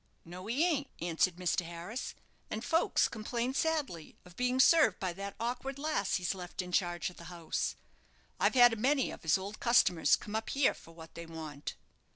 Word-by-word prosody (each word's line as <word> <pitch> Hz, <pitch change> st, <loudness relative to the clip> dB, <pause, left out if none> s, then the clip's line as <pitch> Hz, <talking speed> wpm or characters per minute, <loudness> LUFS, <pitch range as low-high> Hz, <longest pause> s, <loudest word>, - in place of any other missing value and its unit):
"No, 180 Hz, +3 st, -9 dB
he 265 Hz, +9 st, +2 dB
ain't," 290 Hz, -5 st, 0 dB
answered 170 Hz, +1 st, +1 dB
Mr. 180 Hz, 0 st, 0 dB
Harris; 170 Hz, +8 st, -6 dB, 0.3 s
"and 220 Hz, +2 st, -4 dB
folks 330 Hz, +1 st, +3 dB
complain 235 Hz, +3 st, -3 dB
sadly 280 Hz, -, -2 dB
of 180 Hz, -1 st, -15 dB
being 250 Hz, +1 st, 0 dB
served 320 Hz, +4 st, +6 dB
by 185 Hz, -2 st, -2 dB
that 200 Hz, +2 st, -6 dB
awkward 250 Hz, +4 st, -3 dB
lass 285 Hz, -9 st, 0 dB
he's 180 Hz, 0 st, 0 dB
left 180 Hz, 0 st, -6 dB
in 180 Hz, -, -9 dB
charge 175 Hz, -1 st, 0 dB
of -, -, -19 dB
the 170 Hz, -, -11 dB
house. 170 Hz, -2 st, -3 dB, 0.6 s
I've -, -, +2 dB
had 245 Hz, -2 st, +8 dB
a -, -, -3 dB
many 265 Hz, +4 st, +2 dB
of -, -, -9 dB
his 160 Hz, 0 st, +3 dB
old 200 Hz, +3 st, -7 dB
customers 235 Hz, -8 st, +4 dB
come 210 Hz, -, -7 dB
up 220 Hz, 0 st, -2 dB
here 275 Hz, 0 st, +3 dB
for 165 Hz, -, -16 dB
what 160 Hz, -1 st, -12 dB
they 170 Hz, 0 st, -8 dB
want." 155 Hz, -3 st, -7 dB
200 Hz, 190 wpm, -32 LUFS, 175-250 Hz, 0.6 s, had